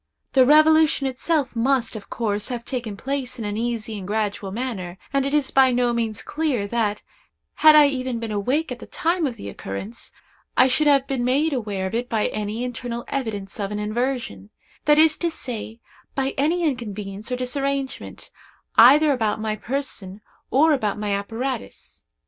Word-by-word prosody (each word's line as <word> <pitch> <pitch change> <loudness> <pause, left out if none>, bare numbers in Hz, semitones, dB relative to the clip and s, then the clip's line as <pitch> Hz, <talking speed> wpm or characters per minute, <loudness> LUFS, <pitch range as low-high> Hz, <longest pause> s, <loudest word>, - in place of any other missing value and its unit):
The 260 -2 +5
revolution 310 -1 +5
itself 270 +1 -1
must, 245 0 +1
of 210 - -9
course, 210 -3 -2
have 240 -2 -5
taken 235 -6 -4
place 265 0 -3
in 225 - -5
an 205 0 -3
easy 225 -2 -3
and 185 - -8
gradual 205 -2 -2
manner, 195 -6 -4 0.2
and 275 0 +2
it - - -2
is 290 -3 +1
by 265 -1 +5
no 245 -1 +1
means 225 -3 -2
clear 290 -9 -1
that, 210 -1 -1 0.5
had 310 0 +7
I 300 -1 +8
even 255 -3 -3
been 230 -1 -4
awake 250 +10 0
at 245 - -5
the - - -10
time 335 -1 0
of 245 - -5
the 100 - -9
occurrence, 100 - -7 0.5
I 255 - +7
should 295 +4 +2
have 280 -2 +4
been 265 -3 -2
made 285 +5 +2
aware 205 -7 -2
of 190 - -4
it 240 +2 -2
by 220 -2 +1
any 215 +2 -3
internal 240 -1 -4
evidence 215 -7 -4
of 200 -1 -2
an 210 - -4
inversion—that 230 - -2
is 310 0 +5
to 340 - +1
say, 235 -7 -6 0.4
by 270 0 0
any 325 +6 +1
inconvenience 215 -6 -3
or - - +1
disarrangement, 275 +2 -3 0.5
either 290 +6 +8
about 220 -5 0
my 215 0 -2
person 215 -5 -4 0.3
or 310 +4 +4
about 215 -7 -1
my 210 -1 -2
apparatus. 225 +6 -5
245 Hz, 175 wpm, -23 LUFS, 215-275 Hz, 0.5 s, I